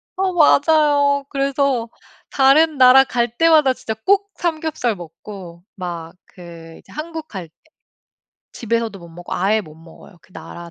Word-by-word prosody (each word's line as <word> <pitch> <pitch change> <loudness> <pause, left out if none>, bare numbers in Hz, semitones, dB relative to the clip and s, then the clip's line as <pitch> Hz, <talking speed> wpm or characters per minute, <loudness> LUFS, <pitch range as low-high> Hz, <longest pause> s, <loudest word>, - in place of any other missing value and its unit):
어 380 -1 -1
맞아요. 290 -3 +3
그래서 275 -3 -1 0.4
다른 290 +3 +3
나라 260 +1 +7
갈 240 -2 -2
때마다 315 -5 +4
진짜 225 - -6
꼭 400 +1 +2
삼겹살 315 -8 -2
먹고 175 0 -11
막 170 -3 -7 0.2
그 170 -2 -12
이제 - - -20
한국 320 +1 -7
갈 185 -5 -8
때 - - -53 1.0
집에서도 230 -2 -3
못 170 - -13
먹고 175 +1 -8
아예 205 +4 +1
못 155 -7 -13
먹어요 165 +3 -17
그 185 - -25
나라 170 +1 -10
240 Hz, 265 characters per minute, -19 LUFS, -, 1.0 s, 나라